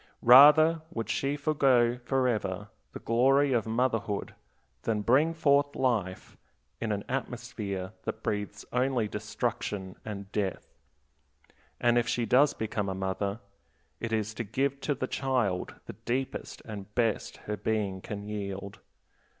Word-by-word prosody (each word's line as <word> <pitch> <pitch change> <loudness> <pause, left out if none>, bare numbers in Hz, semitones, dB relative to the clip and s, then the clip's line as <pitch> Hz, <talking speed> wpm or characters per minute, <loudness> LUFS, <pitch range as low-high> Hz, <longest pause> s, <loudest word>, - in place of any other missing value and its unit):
Rather 150 +6 +8
would 115 -10 -3
she 140 +1 0
forego 130 -5 +3
forever 110 -7 -1 0.2
the - - -7
glory 135 +4 +3
of 115 -2 +1
motherhood 115 -3 -1 0.5
than 105 -2 -1
bring 140 +9 +4
forth 145 -3 +2
life 110 -8 -1 0.4
in - - -2
an - - -2
atmosphere 95 -2 -4
that - - -5
breathes 105 0 -3
only 125 -3 +1
destruction 105 -2 -3
and 100 -2 -7
death. 100 -3 -3 1.1
And 120 0 +4
if 120 - -1
she 120 -1 0
does 135 +6 +4
become 105 -2 -2
a 95 - -3
mother, 100 +3 -2 0.6
it 115 - -4
is 110 -1 -1
to 115 - -4
give 135 +5 -1
to 145 - 0
the 130 - -2
child 125 -9 -1
the - - -7
deepest 130 +2 -4
and 105 -2 -8
best 115 -4 0
her 105 - -2
being 105 -2 -2
can 100 +1 -6
yield. 100 -1 -5
115 Hz, 135 wpm, -29 LUFS, 105-130 Hz, 1.1 s, Rather